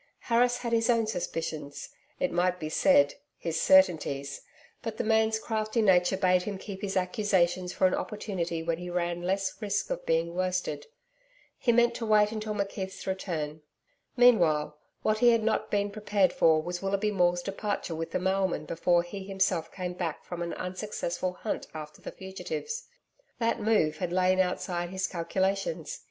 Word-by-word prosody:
Harris 245 +1 +2
had 235 -1 -3
his 225 +1 +2
own 230 -2 +3
suspicions 165 -7 -4 0.3
it 275 - 0
might 180 +1 +1
be 155 - -4
said, 285 - +4 0.2
his - - -2
certainties, 150 - +3 0.4
but 225 -2 -5
the - - -1
man's 220 0 +3
crafty 220 0 -2
nature 190 -3 +4
bade 185 -1 +3
him 200 +1 -4
keep 195 0 -8
his 195 -1 -2
accusations 180 -1 +1
for 185 - +1
an 185 - +4
opportunity 175 -6 -3
when 165 0 -1
he 180 0 -6
ran 175 0 -1
less 190 +4 -1
risk 205 -1 -1
of - - -3
being 165 +1 +1
worsted. 180 -5 -2 0.7
He 240 - +3
meant 235 0 +4
to 230 - -4
wait 210 -1 +4
until 215 -1 -3
McKeith's 195 -1 -4
return. 160 -5 -3 0.6
Meanwhile 170 -12 +4 0.3
what 215 0 +2
he 240 - +6
had 230 -2 +3
not 220 0 0
been 205 0 0
prepared 205 -3 +1
for 160 -1 +4
was 175 +2 -4
Willoughby 200 +2 0
Maule's 175 -2 +2
departure 200 -3 -3
with 165 0 -4
the - - -1
mailman 190 -3 0
before 170 +2 +2
he 190 +3 -7
himself 190 -4 0
came 180 -1 -4
back 175 -3 -4
from 175 -1 -6
an 170 0 -3
unsuccessful 185 -1 -3
hunt 210 - -4
after 150 -1 -8
the - - -7
fugitives. 450 - -5 0.5
That 230 -1 0
move 205 -8 +2
had 175 +1 -3
lain 185 +1 +3
outside 180 -1 -1
his 190 +1 -2
calculations. 185 -1 -2
190 Hz, 170 wpm, -29 LUFS, 175-215 Hz, 0.7 s, he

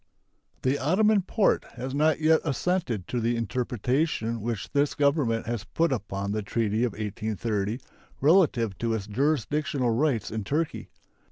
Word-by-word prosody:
The 130 +2 +1
Ottoman 200 +8 +3
Porte 200 +3 +2
has 130 +2 -5
not 155 +2 +2
yet 160 0 +4
assented 150 - -1
to 125 - -2
the 120 +1 +1
interpretation 120 0 -1
which 115 -2 -4
this 145 0 +1
Government 140 -6 +1
has 115 -3 -3
put 165 - 0
upon 100 -3 -3
the 110 +1 -1
treaty 110 +1 0
of 120 -5 0
1830 105 +1 -2 0.4
relative 140 - +3
to 115 -1 0
its 105 -3 -4
jurisdictional 140 +2 0
rights 120 -2 0
in 110 -1 -3
Turkey. 150 +9 -2
125 Hz, 145 wpm, -27 LUFS, 110-150 Hz, 0.4 s, yet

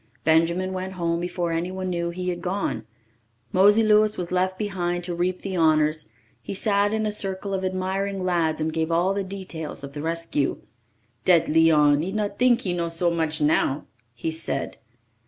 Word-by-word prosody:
Benjamin 170 +4 +2
went 185 0 -4
home 170 -2 -1
before 175 -1 -2
anyone 185 +3 -2
knew 170 -1 -1
he 180 +1 -3
had 175 -1 -3
gone. 180 - -2 0.6
Mosey 205 +4 +5
Louis 215 0 +4
was 175 -1 -4
left 185 +1 0
behind 175 -4 -2
to 175 0 -3
reap 180 +1 -2
the 195 -1 -3
honours; 155 -2 +2 0.3
he - - -6
sat 205 0 +2
in 220 0 0
a 210 - 0
circle 195 -1 -2
of 190 -1 -2
admiring 190 +1 -2
lads 170 -4 +1
and 155 0 -1
gave 160 0 -1
all 175 +4 +2
the 200 0 -1
details 185 -7 -6
of 140 0 -8
the 145 - -5
rescue. 165 -3 -1 0.7
"Dat 175 -3 +5
Leon, 150 -2 +4
he 180 +4 -3
not 205 -1 -3
tink 250 -1 +4
he 180 - -2
know 170 -1 -1
so 170 +1 +2
much 160 -1 -1
now!" 150 -2 +1 0.3
he 160 - -3
said. 160 +1 -3
175 Hz, 180 wpm, -24 LUFS, 165-190 Hz, 0.7 s, Mosey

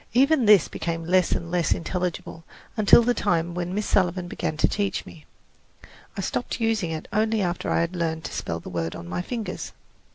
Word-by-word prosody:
Even 270 0 +4
this 205 -6 +6
became 165 0 -4
less 185 0 +3
and 170 0 -3
less 175 -4 +2
intelligible 175 -1 -4 0.3
until 215 +2 +6
the 245 +1 +2
time 175 -6 0
when 175 0 -3
Miss 210 0 -1
Sullivan 180 -2 +1
began 155 -3 -3
to - - +4
teach 200 -1 -2
me. 155 - -13 0.9
I - - -1
stopped - - -3
using 225 -6 0
it 160 -1 -5
only 220 +1 +2
after 175 -1 -2
I - - +2
had 170 +2 -2
learned 160 -2 -2
to - - -6
spell 85 0 -3
the - - -12
word 85 -2 -3
on 85 - -8
my 90 - -2
fingers. 225 +3 -5
175 Hz, 195 wpm, -25 LUFS, 165-210 Hz, 0.9 s, this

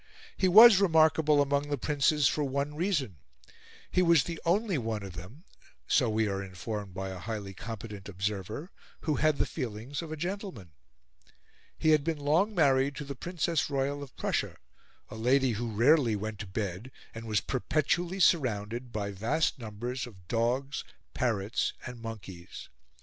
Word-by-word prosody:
He 190 - +2
was 215 +2 +9
remarkable 160 -5 +4
among 140 +1 -1
the 145 - 0
princes 145 +1 +2
for 150 - 0
one 140 +1 -2
reason: 150 - -1 0.7
he 185 - +3
was 170 -6 +5
the 170 -2 -6
only 190 -1 +1
one 110 -3 -3
of 95 -2 -8
them 95 - -10 0.4
so 125 -5 +3
we 110 0 +1
are 100 -1 -2
informed 95 +1 -6
by 95 0 -4
a 95 -1 -7
highly 100 0 -5
competent 105 -1 -8
observer 100 - -4 0.3
who 155 -4 0
had 155 +1 +2
the - - +2
feelings 125 +1 -5
of 165 -2 -8
a 155 - -4
gentleman. 175 - -5 1.1
He 155 - +3
had 155 -2 +4
been 165 0 -1
long 160 +9 +1
married 140 -3 +3
to 150 - -6
the 140 - -5
Princess 165 +2 -1
Royal 140 +1 -1
of 140 -3 -10
Prussia, - - -1 0.5
a - - -8
lady 130 +3 +2
who 115 +2 -3
rarely 120 +1 +4
went 105 0 -5
to 105 - -6
bed 95 +3 -4 0.2
and 115 +1 -8
was 105 -2 +2
perpetually 165 +7 -1
surrounded 120 - +1
by 100 -2 -3
vast 130 +11 0
numbers 120 +3 -5
of 95 -7 -16
dogs, 125 +6 -1 0.3
parrots, 110 -4 0
and 125 -2 -8
monkeys. 100 -6 -9
130 Hz, 160 wpm, -29 LUFS, 105-155 Hz, 1.1 s, was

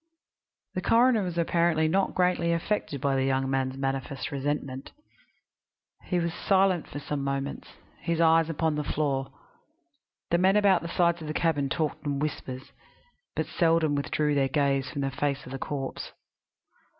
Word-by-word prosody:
The 185 - -2
coroner 235 +2 +4
was 180 -3 -3
apparently 170 -1 +2
not 190 +4 +1
greatly 180 -2 +2
affected 170 -4 -2
by 140 +1 +1
the 135 - +1
young 135 0 +1
man's 130 0 -1
manifest 135 -1 -3
resentment. 140 -1 -3 1.1
He 180 - 0
was 170 -1 -1
silent 190 -2 +2
for - - -8
some 145 -1 -3
moments, 140 0 -3 0.3
his 170 -1 -2
eyes 165 0 +4
upon 160 0 0
the 150 0 -2
floor. 135 -2 -1 1.0
The 170 - +3
men 190 +2 +4
about 200 -4 +4
the 170 - -5
sides 170 0 +1
of 155 - -6
the 155 - -4
cabin 145 -5 +1
talked 155 0 -2
in 145 -2 -1
whispers, 135 -3 -4 0.6
but - - 0
seldom 165 -3 +2
withdrew 145 +1 0
their 135 -2 +2
gaze 135 -2 +1
from 140 - -4
the 135 0 -1
face 140 +1 -2
of 125 - -10
the 135 - -5
corpse. 135 -1 -5
150 Hz, 160 wpm, -27 LUFS, 135-170 Hz, 1.1 s, coroner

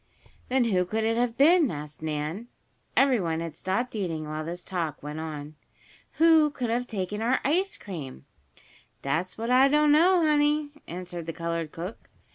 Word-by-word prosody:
"Then 260 0 +3
who 190 -6 +2
could 220 +5 -2
it 225 +1 +1
have 240 -1 0
been?" 320 +1 +5
asked 150 -2 -7
Nan. 155 +8 -3 0.5
Everyone 205 -13 +3
had 165 -2 -5
stopped 225 +7 -2
eating 165 -7 -3
while 155 +1 -4
this 170 +2 -6
talk 165 -7 -4
went 150 +1 -5
on. 155 -2 -6 0.6
"Who 320 -2 +5
could 250 -5 -3
have 245 +1 -1
taken 205 0 -3
our 245 +3 +2
ice 380 +8 +1
cream?" 145 -9 -8 0.8
"Dat's 160 +7 -2
what 230 +2 -2
I 260 +2 +6
don't 300 +1 +4
know, 345 +3 +5
honey," 295 0 +2 0.2
answered 175 -1 -7
the 165 - -3
colored 165 -1 -3
cook. 180 +6 -8
205 Hz, 165 wpm, -27 LUFS, 165-270 Hz, 0.8 s, I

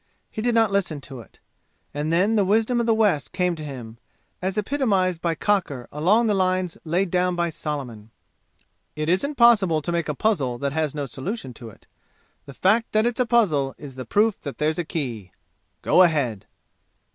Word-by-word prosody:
He 215 - -5
did 240 +1 +1
not 225 -3 +3
listen 185 -7 -1
to 135 -2 -9
it. 115 - -15 0.6
And 150 +2 -2
then 195 +7 +2
the 205 - +3
wisdom 220 +5 +2
of 235 - 0
the 225 - +4
West 175 - +1
came 180 -1 0
to 155 - -8
him, 120 -6 -8 0.4
as 190 +2 -2
epitomized 200 - 0
by 170 -1 0
Cocker 160 - -1
along 190 +11 +2
the 215 - +2
lines 185 -2 0
laid 175 +3 0
down 180 0 +1
by 170 -1 0
Solomon. 130 -9 -6 0.9
"It 155 +1 -2
isn't 280 - +1
possible 210 - +5
to 175 - -2
make 170 -2 -1
a 150 - -2
puzzle 140 - 0
that 140 +2 -2
has 155 -2 -1
no 145 -2 -2
solution 135 - -6
to 115 0 -10
it. 105 - -18 0.6
The 140 - -10
fact 220 +5 +2
that 215 +1 +3
it's 240 +1 -1
a 250 - +2
puzzle 155 - +2
is 145 -3 -10
the 130 0 -7
proof 210 - +1
that 140 - -7
there's 155 +2 0
a - - 0
key! 120 - -5 0.5
Go - - +5
ahead!" 140 - +1
170 Hz, 190 wpm, -23 LUFS, 140-210 Hz, 0.9 s, possible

